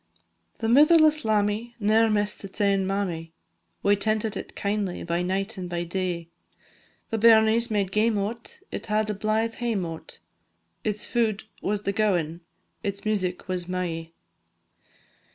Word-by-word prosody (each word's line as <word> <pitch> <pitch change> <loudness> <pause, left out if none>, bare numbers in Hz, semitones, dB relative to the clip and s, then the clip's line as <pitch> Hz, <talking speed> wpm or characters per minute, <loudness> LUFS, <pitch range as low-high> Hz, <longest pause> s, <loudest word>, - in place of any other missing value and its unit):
The 225 - -2
mitherless 305 +4 +6
lammie 215 +2 0
ne'er 220 +2 +4
miss'd 210 -1 0
its 195 +2 -8
ain 195 -2 +2
mammie, 175 -5 -2 0.5
We 200 0 +5
tentit 215 +1 0
it - - -7
kindly 200 -3 -2
by 170 +1 -1
night 195 +3 -2
and 180 -1 -5
by 175 0 -2
day, 175 -1 -3 0.8
The 225 - 0
bairnies 225 +1 +5
made 200 -3 0
game 215 +2 +2
o't, 225 - -4
it - - -5
had 215 0 +1
a - - -2
blithe 215 +3 0
hame 225 -6 0
o't, 165 -1 -8 0.7
Its 210 -1 -2
food 220 -4 0 0.2
was 205 0 -1
the 200 - -1
gowan 175 -6 0 0.4
its 200 0 -4
music 185 -4 -1
was 180 -2 -3
"mai." 170 -3 -3
205 Hz, 145 wpm, -26 LUFS, 185-220 Hz, 0.8 s, mitherless